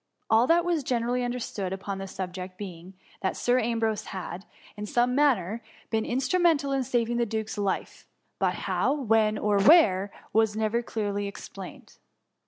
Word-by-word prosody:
All 225 Hz, +3 st, +5 dB
that 340 Hz, +2 st, +4 dB
was 345 Hz, -3 st, +1 dB
generally 245 Hz, 0 st, 0 dB
understood 240 Hz, -6 st, -3 dB
upon 195 Hz, 0 st, -4 dB
the 195 Hz, -, -5 dB
sub 185 Hz, -1 st, -5 dB
ject 185 Hz, 0 st, -7 dB
being, 185 Hz, -2 st, -9 dB, 0.3 s
that 190 Hz, -, -1 dB
Sir 245 Hz, +1 st, +2 dB
Ambrose 225 Hz, -2 st, 0 dB
had, 185 Hz, -1 st, -6 dB, 0.3 s
in 210 Hz, 0 st, -6 dB
some 240 Hz, +3 st, +2 dB
manner, 235 Hz, -7 st, +2 dB, 0.3 s
been 220 Hz, -1 st, +1 dB
instrumental 285 Hz, +2 st, +2 dB
in 270 Hz, -1 st, +1 dB
saving 240 Hz, -1 st, 0 dB
the 240 Hz, -, +2 dB
duke^s 220 Hz, 0 st, -3 dB
life; 200 Hz, -2 st, -3 dB, 0.3 s
but -, -, +1 dB
how, -, -, +1 dB
when, 220 Hz, -5 st, +2 dB
or 205 Hz, -1 st, +2 dB
where, 200 Hz, -, +6 dB, 0.2 s
was 220 Hz, -1 st, +3 dB
never 220 Hz, +2 st, +1 dB
clear 215 Hz, -3 st, -3 dB
ly 205 Hz, -, -1 dB
explained. 200 Hz, -, -9 dB
220 Hz, 165 wpm, -27 LUFS, 200-245 Hz, 0.3 s, where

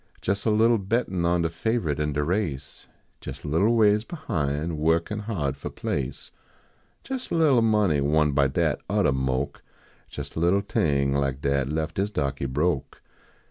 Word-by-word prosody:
Jes 100 Hz, +1 st, -1 dB
a -, -, +3 dB
little 115 Hz, +2 st, +4 dB
bettin 95 Hz, -3 st, -1 dB
on 85 Hz, 0 st, +2 dB
de -, -, +2 dB
faverite 85 Hz, -3 st, -1 dB
in 75 Hz, -1 st, -1 dB
de 75 Hz, +1 st, 0 dB
race; 75 Hz, -5 st, -3 dB, 0.4 s
Jes 70 Hz, 0 st, -8 dB
a -, -, -6 dB
little 100 Hz, +10 st, +2 dB
ways 105 Hz, -1 st, +4 dB
behin, 80 Hz, -, -3 dB
workin 80 Hz, +7 st, +1 dB
hard 90 Hz, -, -2 dB
fo -, -, -6 dB
place; 65 Hz, -2 st, -4 dB, 0.8 s
Jes 260 Hz, -1 st, -4 dB
a -, -, -1 dB
little 150 Hz, -7 st, +4 dB
money 105 Hz, -9 st, +2 dB
won 75 Hz, +1 st, +2 dB
by 70 Hz, 0 st, +3 dB
dat 65 Hz, -, 0 dB
oddah -, -, +2 dB
moke. 65 Hz, +1 st, -2 dB, 0.5 s
Jes 70 Hz, -1 st, -7 dB
a -, -, -2 dB
little 90 Hz, +4 st, +3 dB
thing 70 Hz, -8 st, +1 dB
like 70 Hz, -1 st, -1 dB
dat 70 Hz, -1 st, 0 dB
lef 80 Hz, +1 st, -2 dB
dis 100 Hz, +3 st, -1 dB
dahkey 70 Hz, -7 st, -2 dB
broke. 75 Hz, -1 st, -1 dB
80 Hz, 170 wpm, -25 LUFS, 70-105 Hz, 0.8 s, little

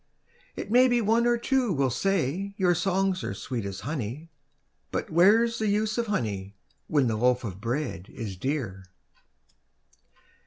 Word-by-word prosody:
It 205 Hz, -, -6 dB
may 250 Hz, +2 st, +6 dB
be 245 Hz, -1 st, +2 dB
one 230 Hz, +2 st, +2 dB
or 240 Hz, 0 st, +3 dB
two 250 Hz, -1 st, +1 dB
will 135 Hz, -5 st, +1 dB
say 195 Hz, +4 st, -1 dB
your 180 Hz, -2 st, +3 dB
songs 190 Hz, +1 st, 0 dB
are -, -, -3 dB
sweet 120 Hz, -5 st, -4 dB
as 95 Hz, -1 st, -5 dB
honey, 140 Hz, +4 st, -5 dB, 0.6 s
But -, -, -3 dB
where's 225 Hz, +8 st, +4 dB
the 220 Hz, -, 0 dB
use 215 Hz, +2 st, +1 dB
of 235 Hz, -, -1 dB
honey, 100 Hz, -, -2 dB, 0.3 s
when 145 Hz, -4 st, +2 dB
the 115 Hz, -2 st, 0 dB
loaf 125 Hz, +3 st, +2 dB
of 100 Hz, -3 st, -6 dB
bread 120 Hz, -, -3 dB
is 105 Hz, -5 st, -6 dB
dear? 105 Hz, -5 st, -3 dB
160 Hz, 155 wpm, -27 LUFS, -, 0.6 s, may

